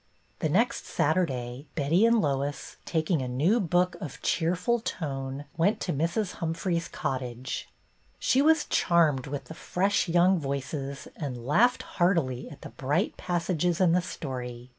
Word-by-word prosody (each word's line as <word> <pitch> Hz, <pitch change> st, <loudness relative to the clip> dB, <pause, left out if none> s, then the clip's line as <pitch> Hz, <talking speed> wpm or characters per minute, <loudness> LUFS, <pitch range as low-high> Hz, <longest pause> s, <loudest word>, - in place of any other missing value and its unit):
The -, -, 0 dB
next -, -, +1 dB
Saturday 135 Hz, -5 st, -1 dB
Betty 165 Hz, +8 st, +3 dB
and 230 Hz, 0 st, +4 dB
Lois, 140 Hz, -3 st, -2 dB
taking 160 Hz, -1 st, 0 dB
a 130 Hz, -, -3 dB
new 155 Hz, -, +2 dB
book 180 Hz, -1 st, +2 dB
of 150 Hz, -, -6 dB
cheerful 180 Hz, +8 st, +1 dB
tone, 135 Hz, -8 st, -4 dB
went 190 Hz, +6 st, +2 dB
to 175 Hz, -, -1 dB
Mrs. 170 Hz, +7 st, 0 dB
Humphrey's 170 Hz, +1 st, -1 dB
cottage. 130 Hz, -5 st, -4 dB, 0.5 s
She 265 Hz, -, +3 dB
was 315 Hz, +1 st, +4 dB
charmed 155 Hz, -7 st, +2 dB
with 140 Hz, 0 st, -4 dB
the -, -, -9 dB
fresh 190 Hz, +3 st, 0 dB
young 175 Hz, +2 st, +4 dB
voices 140 Hz, 0 st, -4 dB
and 125 Hz, -6 st, -5 dB
laughed 235 Hz, -, +3 dB
heartily 165 Hz, -9 st, 0 dB
at 145 Hz, -, -12 dB
the -, -, -7 dB
bright 145 Hz, +9 st, -1 dB
passages 175 Hz, -1 st, 0 dB
in 180 Hz, -3 st, +4 dB
the 180 Hz, +2 st, +3 dB
story. 125 Hz, -7 st, -6 dB
160 Hz, 145 wpm, -28 LUFS, 135-180 Hz, 0.5 s, and